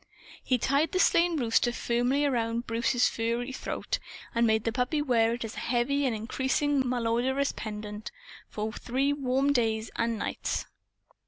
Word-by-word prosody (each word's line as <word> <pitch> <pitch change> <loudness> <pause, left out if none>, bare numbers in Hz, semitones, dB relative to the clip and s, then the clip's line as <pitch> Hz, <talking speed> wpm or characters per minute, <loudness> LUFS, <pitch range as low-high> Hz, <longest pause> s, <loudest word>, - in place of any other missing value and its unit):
He 255 - +2
tied 280 - +1
the 370 - +1
slain 340 -2 +4
rooster 240 0 +2
firmly 245 +4 +1
around 235 -3 0
Bruce's 235 +2 +2
furry 235 +3 -2
throat, - - -3 0.3
and 235 0 +3
made 220 -1 +2
the 230 - 0
puppy 250 +6 0
wear 235 -5 +2
it, 235 - -5
as 220 - -7
a - - -5
heavy 265 +4 +1
and 240 - 0
increasingly 265 +5 0
malodorous 250 +3 +1
pendant, 210 0 -6 0.4
for 215 +1 -4
three 270 +5 0
warm 275 0 +1
days 225 -3 0
and 230 -1 0
nights. - - -2
245 Hz, 155 wpm, -28 LUFS, 230-275 Hz, 0.4 s, slain